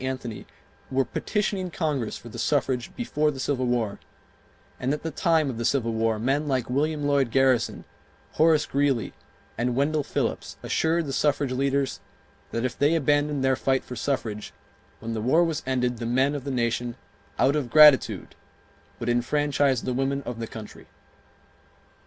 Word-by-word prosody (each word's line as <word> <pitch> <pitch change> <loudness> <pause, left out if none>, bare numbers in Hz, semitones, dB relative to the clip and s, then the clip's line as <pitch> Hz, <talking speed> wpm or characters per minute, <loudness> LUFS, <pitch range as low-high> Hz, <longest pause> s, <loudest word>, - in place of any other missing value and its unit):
Anthony 130 -4 -5 0.4
were 135 0 +1
petitioning 200 -3 -2
Congress 150 -9 -2
for - - -13
the 115 - -8
suffrage 130 -4 0
before 155 - 0
the 140 -3 -5
Civil 130 -2 -1
War, 115 -4 -1 0.8
and 130 +1 -1
at 150 - -10
the 160 - -3
time 160 -1 +2
of 125 -4 -4
the - - -2
Civil 115 -1 +1
War 110 0 +1
men 135 +7 0
like 130 -3 -1
William 150 +3 0
Lloyd 140 -3 +2
Garrison, 130 -1 +2 0.5
Horace 160 -1 +3
Greeley, 140 -5 0 0.5
and 120 0 0
Wendell 150 +3 +1
Phillips - - -3
assured 165 +1 +1
the 135 - -4
suffrage 145 -2 +1
leaders 135 +1 0 0.5
that 115 +2 -2
if 130 - -2
they 145 +3 +2
abandoned 145 -2 +1
their 130 0 +3
fight 130 0 0
for 125 - -8
suffrage, 115 -4 -3 0.5
when 115 0 -4
the 110 - -3
war 145 +9 +4
was 165 -3 -1
ended 125 -2 0
the 115 - -3
men 130 +4 +2
of 145 -2 -5
the - - -3
nation 120 -1 -1 0.4
"out 140 - +3
of 140 -5 -1
gratitude" 150 -1 +6 0.7
would 120 - -4
enfranchise 135 +2 +1
the 125 - -2
women 135 +2 -1
of 120 -2 -6
the 115 - -4
country. 110 -2 -10
135 Hz, 165 wpm, -25 LUFS, 120-145 Hz, 0.8 s, gratitude